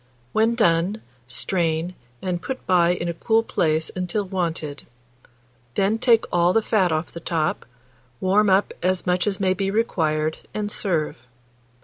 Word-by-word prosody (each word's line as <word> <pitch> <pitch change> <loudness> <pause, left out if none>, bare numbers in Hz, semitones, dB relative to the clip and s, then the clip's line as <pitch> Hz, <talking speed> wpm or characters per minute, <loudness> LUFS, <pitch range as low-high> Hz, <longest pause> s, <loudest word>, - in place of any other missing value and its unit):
When 225 +2 +3
done, 185 -1 +2 0.3
strain, 165 +5 0 0.3
and 180 -2 -2
put 265 -1 -5
by 175 -2 +4
in 175 -1 -1
a 170 - -1
cool 225 +6 +2
place 160 -6 0
until 185 +3 -1
wanted; 165 -6 -3 0.9
then 200 +3 +1
take 230 -2 +4
all 175 +1 +3
the 225 - +3
fat 195 -6 +2
off 155 +1 -1
the 170 - -7
top, 160 -5 -1 0.5
warm 200 +2 +3
up 190 +2 +3
as 185 0 0
much 180 +2 +1
as 200 -2 -1
may 190 -1 +2
be 195 +1 -1
required, 160 -8 0 0.2
and 210 -1 -2
serve. 165 -7 -1
180 Hz, 150 wpm, -23 LUFS, 165-205 Hz, 0.9 s, by